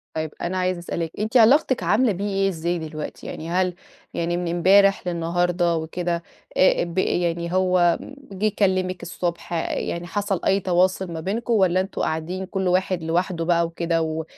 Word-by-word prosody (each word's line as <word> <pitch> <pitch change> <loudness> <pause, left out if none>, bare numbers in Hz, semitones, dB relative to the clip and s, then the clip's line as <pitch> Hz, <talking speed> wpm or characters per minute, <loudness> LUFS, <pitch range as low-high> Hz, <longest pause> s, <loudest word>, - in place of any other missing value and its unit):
طيّب، 155 -1 -2
أنا 180 +2 -2
عايزة 185 -1 0
أسألِك 170 -1 -4
أنتِ 220 +4 +1
علاقتِك 250 - +4
عاملة 215 +7 +3
بيه 200 +1 -3
إيه 195 0 +1
إزاي 170 0 -2
دلوقتي 155 -1 -7
يعني؟ 160 - -6
هل 180 0 0 0.4
يعني 170 +1 -1
من 175 0 -2
امبارح 195 +2 +4
للنهارده 175 0 0
وكده، 170 +1 -2 0.3
آآ 185 - +4
ب 170 +1 -7
يعني 170 -2 0
هو 180 -2 +3 0.4
جيه 210 +3 0
كلمِك 185 -2 +1
الصبح، 175 0 -4 0.2
يعني 170 +1 -3
حصل 200 -1 -2
أي 195 - +3
تواصل 185 0 +1
ما 165 - -5
بينكم، 220 +8 -2
والّا 185 -4 +3
أنتم 190 - -5
قاعدين 165 +4 -2
كل 190 -1 -2
واحد 185 -1 +1
لوحده 170 +1 -1
بقى 170 0 +3
وكده، 165 0 -1
و 160 0 -2
180 Hz, 165 wpm, -23 LUFS, 170-190 Hz, 0.4 s, علاقتِك